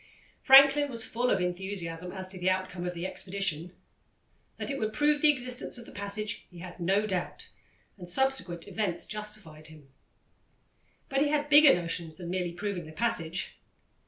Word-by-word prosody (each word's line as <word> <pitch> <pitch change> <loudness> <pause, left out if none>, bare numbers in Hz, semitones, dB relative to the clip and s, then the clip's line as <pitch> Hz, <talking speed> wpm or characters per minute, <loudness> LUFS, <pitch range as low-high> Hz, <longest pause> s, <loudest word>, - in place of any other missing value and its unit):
Franklin 275 +1 +7
was 230 -3 -5
full 245 +2 -1
of - - +2
enthusiasm 180 -1 -3
as 190 -1 -4
to 185 0 -8
the 180 +1 +1
outcome 185 -1 -2
of 180 - -4
the 170 +1 -4
expedition. 185 -3 -3 0.9
That - - -2
it 275 - -3
would 215 -1 -2
prove 295 0 +2
the 305 - +6
existence 250 -3 0
of 235 - -8
the - - -12
passage 210 +2 -4
he 180 - -15
had 175 +1 -10
no 195 +5 +1
doubt, 185 -4 -4 0.5
and 175 -1 -8
subsequent 185 -7 0
events 200 -6 -2
justified 210 -8 -8
him. 155 -3 -15 1.2
But 270 -1 0
he 295 - +3
had 295 0 0
bigger 295 -1 +8
notions 170 -2 -4
than 175 0 -7
merely 180 -2 -2
proving 180 -1 -4
the 155 - -10
passage. 180 -4 -2
190 Hz, 170 wpm, -29 LUFS, 175-235 Hz, 1.2 s, bigger